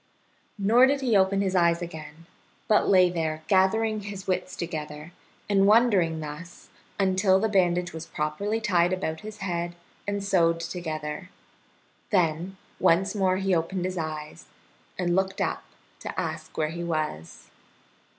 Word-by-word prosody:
Nor 225 +6 +5
did 280 0 +1
he 245 -5 +2
open 195 0 +3
his 190 -1 0
eyes 170 -1 +3
again, 160 -2 -8 0.4
but 215 - +3
lay 185 -2 +6
there 160 -2 -2
gathering 215 +3 +2
his 200 -2 -7
wits 185 -1 -2
together 150 -1 -6 0.4
and 195 -1 +3
wondering 205 -8 +4
thus 155 +4 -9 0.3
until 190 0 +3
the 220 - +1
bandage 180 -4 +1
was 165 0 -7
properly 200 +9 -2
tied 180 -4 +2
about 160 -4 -2
his 215 0 -9
head 175 -1 -2 0.3
and 200 -1 -2
sewed 170 -4 +2
together. 160 0 -5 0.8
Then 180 -1 0 0.2
once 190 +4 +3
more 190 -3 +1
he 195 0 0
opened 175 +2 -1
his 185 -1 -3
eyes, 155 0 -6 0.5
and 175 -1 0
looked 190 0 0
up - - -2 0.3
to - - -5
ask 160 -1 -5
where 155 -1 +1
he 170 +2 -5
was. 155 - -4
180 Hz, 145 wpm, -26 LUFS, 165-195 Hz, 0.8 s, lay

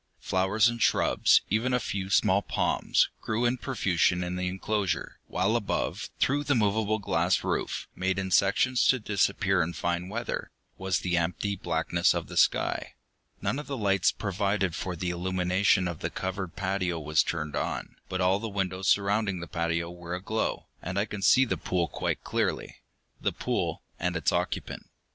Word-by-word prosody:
Flowers 95 +4 +2
and 120 -1 -2
shrubs, - - +4
even 120 +4 +2
a - - +2
few 95 -4 -3
small 95 +1 +4
palms, - - +1
grew 115 +2 -1
in 120 +2 +2
profusion 90 -8 +1
in 90 +1 -3
the 90 0 -2
enclosure, 95 +1 -2
while - - +1
above, - - -2
through 145 +2 +2
the 145 -1 +1
movable 110 0 +2
glass 100 - +1
roof - - -2
made 95 +1 0
in 95 -1 -2
sections 120 +7 +3
to 130 - +5
disappear 105 -4 +1
in 85 +2 -1
fine 85 +1 -2
weather 115 +3 -3 0.3
was 95 -1 -1
the 90 -2 0
empty 90 +4 -1
blackness 85 0 +1
of - - -2
the - - -7
sky. - - +1 0.5
None 140 - 0
of 150 - -7
the 140 - -3
lights 100 -4 +3
provided 100 -2 -1
for 90 +2 -4
the 90 +2 -2
illumination 90 +1 +1
of 85 -3 -5
the - - -2
covered 95 -1 -4
patio 95 -3 -1
was 75 0 +2
turned 75 -3 -3
on, - - -3
but 95 - -2
all 95 +1 +3
the 115 +1 -4
windows 95 -2 -2
surrounding 100 -1 +2
the 85 - -5
patio 85 0 -2
were 85 0 -6
aglow, 105 +4 -2 0.2
and 90 +2 -4
I 100 - +2
could 105 -2 -6
see 130 +6 +6
the - - -1
pool 90 -2 -1
quite - - -3
clearly. - - -2 0.4
The - - 0
pool - - -2 0.2
and 90 0 -1
its 80 - +1
occupant. - - -3
95 Hz, 175 wpm, -28 LUFS, 90-105 Hz, 0.5 s, see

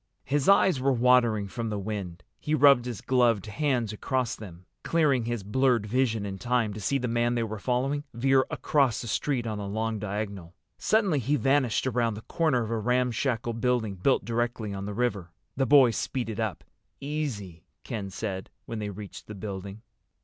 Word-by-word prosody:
His 145 +4 +1
eyes 190 -6 +5
were 135 +1 +3
watering 120 -4 +3
from 115 +3 -4
the 105 - -2
wind. 100 -4 -5 0.2
He 150 - 0
rubbed 140 -4 +6
his 120 -5 -5
gloved 120 -6 +2
hands 120 -2 -1
across 125 +2 -1
them, 90 -4 -11 0.2
clearing 145 -8 +2
his 120 -3 -3
blurred 120 +1 +2
vision 115 -2 0
in 95 -1 -5
time 120 -3 0
to 105 - -7
see 140 +7 +1
the 125 -2 -2
man 120 +1 +1
they 120 - +1
were 110 -1 -5
following 130 +6 0
veer 130 +3 +3
across 135 -6 +1
the 120 - -6
street 125 +2 -1
on 110 -2 -3
a 100 - -4
long 110 +2 -2
diagonal. 100 -4 -5 0.2
Suddenly 200 -9 +2
he 140 +4 +1
vanished 135 -2 +2
around 120 -4 0
the 105 - -8
corner 155 -8 +1
of 110 - -5
a 115 - 0
ramshackle 125 +1 0
building 115 -2 0
built 95 +9 +1
directly 115 -2 -2
on 100 0 -5
the 105 - -5
river. 100 -7 -1 0.3
The 135 0 +1
boys 130 -5 +6
speeded 115 -5 -3
up. 110 -4 -2 0.4
"Easy," 135 - -4 0.2
Ken 100 -4 -4
said, 95 -1 -5 0.2
when 115 - -5
they 105 -1 -3
reached 100 0 -9
the 105 - -8
building. 100 +1 -7
115 Hz, 185 wpm, -27 LUFS, 105-130 Hz, 0.4 s, rubbed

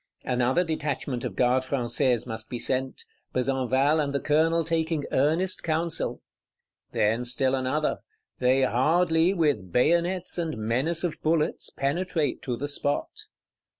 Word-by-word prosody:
Another 125 +7 +2
detachment 145 -6 -3
of - - -4
Gardes 130 +1 +2
Françaises 125 -2 +1
must 110 -2 -5
be 125 - -4
sent; 130 +2 -2 0.3
Besenval 135 +3 +1
and 140 -1 -3
the 140 - +1
Colonel 160 +3 +2
taking 160 -2 -1
earnest 160 +7 +1
counsel. 165 0 -1 0.7
Then 110 +3 +1
still 130 +2 0
another; 135 +4 0 0.4
they 130 +1 +3
hardly, 160 +7 +3
with 145 - 0
bayonets 170 - +1
and 160 -6 -2
menace 130 +11 0
of 175 -3 -3
bullets, 155 -1 +1
penetrate 155 +2 -1
to 125 -2 -3
the 145 - -3
spot. 145 0 -2
140 Hz, 130 wpm, -26 LUFS, 125-160 Hz, 0.7 s, they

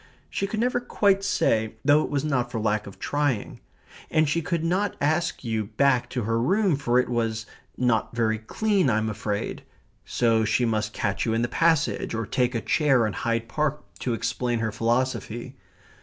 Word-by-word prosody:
She 195 - -1
could 215 +2 -3
never 245 +1 +1
quite 200 -5 +2
say, 110 - +1
though 145 +1 +5
it - - -4
was 145 0 -1
not 125 -5 0
for 115 - -2
lack 105 -1 0
of 100 - -10
trying. 145 -7 -1 0.5
And 155 -1 +3
she 165 +4 +1
could 170 0 -2
not 185 +4 0
ask 160 +2 0
you 110 -3 -1
back 135 -3 +3
to 125 -3 -2
her 115 +2 0
room, 190 - +2
for 125 -3 +1
it 125 - +3
was 115 -2 -1 0.3
"not 120 -2 +1
very 110 -2 +1
clean, 195 - +1
I'm 110 -1 +1
afraid," 105 0 -3 0.4
so 115 -2 +2
she 120 +3 +1
must 110 -1 0
catch 100 -1 -1
you 110 - +1
in 115 - +1
the - - +1
passage, 160 -1 +1
or 115 -1 -2
take 125 +4 0
a 115 - 0
chair 135 -7 +3
in 105 - -2
Hyde 115 0 -1
Park 150 +3 -1 0.2
to 120 -3 -1
explain 120 +1 -1
her 110 -1 -1
philosophy. 120 +2 -1
120 Hz, 185 wpm, -25 LUFS, 115-150 Hz, 0.5 s, though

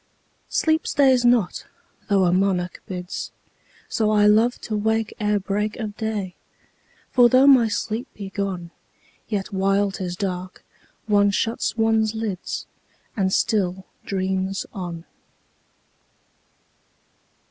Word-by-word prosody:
10 - - -42 0.4
Sleep 315 0 +1
stays 260 -3 +4
not, 240 -7 +2 0.4
though 195 -2 +4
a 175 - +2
monarch 185 -2 0
bids: 180 -1 -5 0.6
So 215 -2 0
I 210 -1 +4
love 220 +4 +4
to 215 - -4
wake 220 +1 0
ere 210 -1 +1
break 205 +2 -2
of 215 -3 -5
day: 215 -5 -3 0.8
For 245 -1 +6
though 255 +3 +5
my 260 -5 +7
sleep 220 +4 -3
be 195 -2 -7
gone, 190 -4 -4 0.6
Yet 205 -1 -3
while 195 +1 +2
'tis 185 -2 -4
dark, 185 -1 -5 0.4
one 205 -2 +4
shuts 225 +3 -1
one's 225 -1 +2
lids, 215 -5 -4 0.5
And 190 -3 +1
still 190 -3 0 0.2
dreams 190 0 -2
on. 175 -3 -6
205 Hz, 120 wpm, -23 LUFS, 190-220 Hz, 0.8 s, my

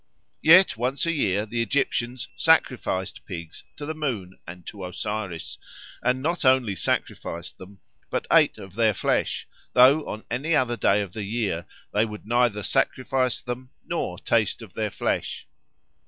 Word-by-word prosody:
Yet 175 0 +7
once 130 +5 0
a 165 - +1
year 105 - +1
the 115 +2 -2
Egyptians 120 -1 -1
sacrificed 125 - +1
pigs 85 -3 -8
to 145 - -5
the 160 - -3
moon 115 -12 -4
and 90 +1 -10
to 100 -2 -8
Osiris, 90 -1 -4 0.4
and 130 +1 +1
not 170 +3 -1
only 130 -6 +4
sacrificed - - -3
them, 95 +1 -12 0.3
but - - -2
ate - - +5
of 95 -2 -10
their 110 -1 +2
flesh, - - 0 0.3
though 135 +5 +7
on 110 - -5
any 145 +7 +1
other 125 -4 +2
day 100 -1 +3
of 95 -3 -9
the 110 - -4
year 100 -6 -2 0.3
they 105 +2 +3
would 105 -1 -9
neither 120 -2 +2
sacrifice 130 +2 0
them 125 +1 -5 0.2
nor - - -2
taste - - +1
of - - -13
their - - -1
flesh. - - -2
115 Hz, 155 wpm, -25 LUFS, 100-130 Hz, 0.4 s, Yet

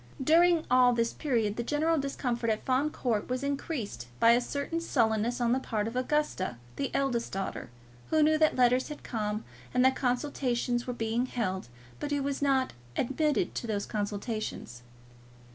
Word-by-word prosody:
During 335 +2 +5
all 250 -1 +6
this 230 -1 0
period 230 -8 0
the 235 - -1
general 310 +5 +1
discomfort 245 -4 -2
of 215 -1 0
Fawn 265 +3 +1
Court 235 -8 -2
was 255 +2 -2
increased 275 - -3
by 230 - +7
a 240 +1 +4
certain 285 +6 -3
sullenness 230 -5 +1
on 235 -1 +2
the 255 - +3
part 220 -4 -2
of 230 - -6
Augusta, 255 - 0 0.2
the 275 - -2
elder 270 -4 +1
daughter, 195 -8 -4 0.4
who 315 -1 +4
knew 310 +1 +4
that 310 -1 +4
letters 250 0 +3
had 300 - -8
come 215 -2 -3 0.3
and 250 0 +4
that 260 0 +4
consultations 245 -2 -1
were 250 - -2
being 230 +2 -1
held, 190 - -2 0.3
but - - -3
who 285 -1 0
was 280 0 -2
not 270 -2 +2 0.2
admitted 295 +4 +1
to 235 - -4
those 205 -2 -1
consultations. 205 - -4
250 Hz, 170 wpm, -29 LUFS, 225-280 Hz, 0.4 s, by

